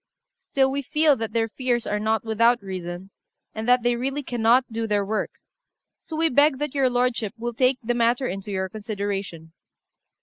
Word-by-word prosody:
Still 265 -1 +1
we 280 +1 -1
feel 300 +2 +3
that 225 -2 -4
their 225 0 +1
fears 240 0 -1
are 210 - -1
not 220 +1 0
without 230 +1 +3
reason, 185 0 -6 0.4
and 220 +1 -5
that 250 -1 +4
they 240 0 +2
really 270 +4 -2
cannot 245 0 +3
do 225 0 -2
their 205 -2 +1
work; 215 +2 -1 0.7
so 320 - -8
we 325 +1 +2
beg 285 0 +4
that 295 -1 -3
your 270 -2 +2
lordship 245 -4 0
will 240 +1 -4
take 255 +2 +2
the 240 +2 0
matter 240 +2 +1
into 195 -2 -5
your 190 -1 -2
consideration." 200 -5 -5
230 Hz, 180 wpm, -24 LUFS, 210-255 Hz, 0.7 s, that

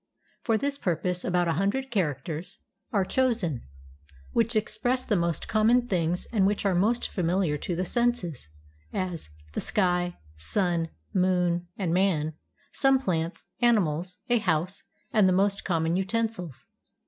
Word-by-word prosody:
For 225 -2 +2
this 280 +4 -1
purpose 180 +1 -1
about 180 -1 +1
a 165 - +2
hundred 265 +7 -1
characters 160 - -2 0.3
are 200 -3 +2
chosen 220 - 0 0.6
which 230 0 +1
express 230 +4 0
the 210 - +1
most 170 -3 -1
common 230 +3 +3
things 175 -3 0
and 195 -4 +4
which 205 0 -1
are 195 - +3
most 215 +7 +2
familiar 175 -3 +1
to 175 - -3
the 180 +2 -1
senses; 215 - 0 0.4
as, 180 - -3 0.2
the - - -2
sky, 180 -3 +1 0.2
sun, 170 - 0 0.2
moon, 180 -2 +2
and 180 -5 -1
man, 170 -5 +2 0.4
some 270 -1 +4
plants, 170 -8 -2 0.2
animals, 185 -7 +2
a 240 -2 +3
house, 180 -1 0 0.3
and 210 -4 +5
the - - +3
most 200 +2 +1
com 165 -3 0
mon 165 +1 +1
utensils. 195 - -2
185 Hz, 145 wpm, -27 LUFS, 170-220 Hz, 0.6 s, and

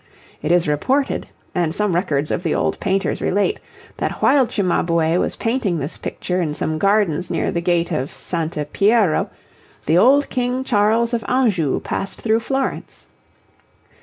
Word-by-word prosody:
It 155 - -1
is 175 -2 +3
reported, 260 - 0 0.3
and 170 -3 0
some 210 -3 0
records 155 -5 0
of - - -1
the 165 -4 -1
old - - -1
painters 195 0 -1
relate, 205 - 0 0.4
that - - -1
while 265 -2 +3
Cimabue 170 -5 +1
was - - 0
painting 225 -7 -1
this 150 +1 -4
picture 180 0 -3
in 150 -3 -2
some 155 +1 -2
gardens 195 -4 +1
near - - -1
the 170 - -1
gate 175 0 +1
of 145 -3 -1
S. - - -9 0.4
Piero, 205 -5 +3 0.6
the 165 +4 +4
old 275 +7 +5
King 250 0 -1
Charles 230 0 +2
of 230 -2 -1
Anjou 205 - +1
passed 195 - -4
through 225 0 +2
Florence. 270 +3 -3
195 Hz, 155 wpm, -20 LUFS, 165-235 Hz, 0.6 s, old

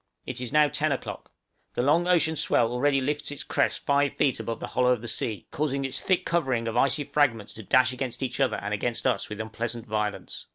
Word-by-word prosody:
It 125 0 -4
is 125 - -4
now 150 0 +5
ten 155 +1 0
o'clock; 135 - -5 0.5
the 120 - +1
long 165 +6 +3
ocean 165 -3 +3
swell 115 -5 +2
already 135 +3 +2
lifts 145 +3 -1
its 145 - -5
crest - - 0
five 140 0 +2
feet 140 -4 +1
above 115 - -4
the - - -4
hollow 125 +1 +1
of 120 -2 0
the - - -5
sea, 110 -4 -1
causing 140 -2 -1
its 135 - -3
thick 185 -2 +1
covering, 130 -9 0
of 115 - -3
icy 140 +4 +2
fragments 125 -8 +1
to 110 - -8
dash 130 +5 +3
against 125 0 -4
each 130 0 -3
other 135 -2 +2
and 105 +1 -4
against 115 +3 -2
us 130 -2 +1
with 105 0 -6
unpleasant 115 +1 -4
violence. 105 -1 -3
130 Hz, 220 wpm, -26 LUFS, 115-145 Hz, 0.5 s, now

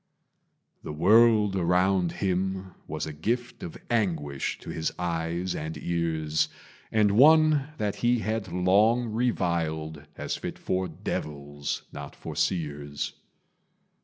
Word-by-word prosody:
The - - -6
world 105 +5 +5
around 90 0 +2
him 95 0 -2
was 80 0 -3
a 80 - -6
gift 120 +11 -2
Of 85 - -7
anguish 80 - -1
to - - -7
his 80 - -2
eyes 85 +1 -2
and 80 +1 -4
ears, 80 -2 0 0.4
And 105 -2 +4
one 150 +4 +6
that 105 -2 -2
he 120 +1 +2
had 110 -4 -2
long 105 +7 +3
reviled 80 -9 -1
As - - -3
fit - - -5
for 95 0 -1
devils, 75 -3 -4
not - - -8
for - - -7
seers. 75 -4 -2
90 Hz, 120 wpm, -27 LUFS, 80-110 Hz, 0.4 s, one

